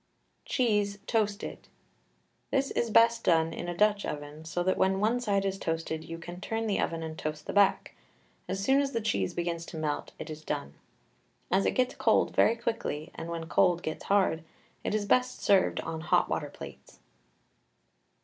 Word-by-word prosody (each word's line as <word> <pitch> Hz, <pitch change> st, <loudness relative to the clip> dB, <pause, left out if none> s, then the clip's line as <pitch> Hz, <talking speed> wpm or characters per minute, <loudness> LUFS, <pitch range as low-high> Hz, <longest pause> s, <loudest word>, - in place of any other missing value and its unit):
CHEESE, 210 Hz, -5 st, +1 dB
TOASTED. 210 Hz, -2 st, -1 dB, 0.8 s
This 275 Hz, 0 st, +1 dB
is 235 Hz, -, 0 dB
best 230 Hz, +1 st, +5 dB
done 165 Hz, -1 st, +3 dB
in -, -, -5 dB
a 175 Hz, -1 st, -4 dB
Dutch 210 Hz, 0 st, +3 dB
oven, 145 Hz, +1 st, -6 dB
so 175 Hz, +2 st, -2 dB
that 185 Hz, +1 st, +2 dB
when 190 Hz, 0 st, +2 dB
one 225 Hz, +4 st, +2 dB
side 200 Hz, -5 st, 0 dB
is 195 Hz, 0 st, -1 dB
toasted 160 Hz, -2 st, -2 dB
you 165 Hz, 0 st, -7 dB
can 175 Hz, +1 st, -9 dB
turn 225 Hz, +1 st, -2 dB
the 210 Hz, -3 st, 0 dB
oven 165 Hz, -1 st, -1 dB
and 160 Hz, 0 st, -6 dB
toast 155 Hz, 0 st, -4 dB
the -, -, -4 dB
back; 200 Hz, -1 st, +3 dB, 0.5 s
as 195 Hz, -, -2 dB
soon 270 Hz, +5 st, +4 dB
as 275 Hz, -1 st, -2 dB
the 230 Hz, -, +1 dB
cheese 100 Hz, -, -1 dB
begins 170 Hz, -1 st, -2 dB
to 160 Hz, -, -7 dB
melt 150 Hz, -2 st, -2 dB
it 155 Hz, -, -7 dB
is 155 Hz, 0 st, -8 dB
done. 70 Hz, -, -3 dB, 0.8 s
As 190 Hz, +2 st, +3 dB
it -, -, 0 dB
gets 255 Hz, 0 st, +2 dB
cold -, -, +2 dB
very 225 Hz, -, +5 dB
quickly, 225 Hz, -9 st, -3 dB
and 165 Hz, +1 st, -7 dB
when 165 Hz, -1 st, -4 dB
cold 175 Hz, +1 st, +3 dB
gets 155 Hz, -, -4 dB
hard, 190 Hz, -5 st, +2 dB, 0.4 s
it -, -, -1 dB
is 210 Hz, -1 st, 0 dB
best 250 Hz, +4 st, +2 dB
served 195 Hz, -2 st, +4 dB
on 160 Hz, -1 st, -5 dB
hot 160 Hz, -, +3 dB
water -, -, -2 dB
plates. -, -, -11 dB
190 Hz, 185 wpm, -29 LUFS, 165-215 Hz, 0.8 s, best